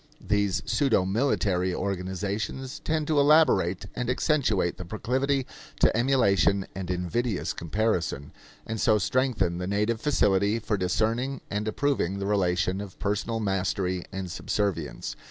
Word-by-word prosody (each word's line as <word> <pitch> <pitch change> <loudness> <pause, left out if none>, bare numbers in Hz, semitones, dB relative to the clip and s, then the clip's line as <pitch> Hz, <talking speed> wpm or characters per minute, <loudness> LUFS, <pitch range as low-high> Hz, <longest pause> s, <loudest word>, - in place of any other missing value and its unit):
These 100 -6 0
pseudo 125 -10 +2
military 95 -4 +1
organizations 100 - -3
tend 155 -1 -1
to 150 -1 +2
elaborate 140 - +4
and 125 -1 -2
accentuate 125 - +1
the 90 - -6
proclivity 130 +8 -1 0.3
to - - +4
emulation 100 -6 +3
and 90 -1 -6
invidious 90 +5 -1
comparison, 85 -6 -1 0.3
and 110 -1 -4
so 110 - +4
strengthen 105 -5 0
the 90 - -3
native 105 +3 0
facility 100 -7 +2
for 110 -1 -1
discerning 110 +8 0
and 105 +1 -2
approving 110 -6 0
the 100 - -3
relation 95 -1 +1
of 100 -3 -9
personal 105 +3 -1
mastery 95 -2 -1
and 95 -2 -5
subservience. 85 -10 -2
100 Hz, 130 wpm, -27 LUFS, 90-120 Hz, 0.3 s, elaborate